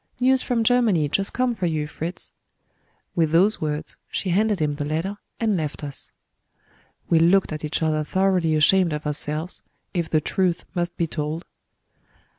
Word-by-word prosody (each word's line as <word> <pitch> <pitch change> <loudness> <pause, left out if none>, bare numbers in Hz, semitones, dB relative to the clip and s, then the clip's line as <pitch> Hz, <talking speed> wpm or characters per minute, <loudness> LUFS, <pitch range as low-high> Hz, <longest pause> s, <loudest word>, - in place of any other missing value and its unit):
"News 260 +1 +4
from 235 -2 0
Germany, 220 -10 +3
just 195 +7 +1
come 255 -1 +1
for 185 -5 -2
you, 155 -2 -1
Fritz." 165 +4 -6 0.8
With 165 -2 +2
those 185 +7 +3
words, 150 -1 -3
she 185 - -2
handed 210 +1 +2
him 150 -2 +1
the 145 0 -4
letter, 165 +7 -2 0.2
and 220 -3 +1
left 155 -3 -3
us. 140 -2 -6 1.0
We 165 - +6
looked 175 +1 +4
at 155 - -6
each 155 +1 -2
other 155 -1 +1
thoroughly 180 -1 +1
ashamed 170 +2 +4
of 150 0 -4
ourselves, 150 +3 0 0.3
if 170 -3 -1
the 155 - +3
truth 180 +2 0
must 175 -1 -2
be 170 - +1
told. 155 +1 -4
170 Hz, 165 wpm, -23 LUFS, 155-195 Hz, 1.0 s, We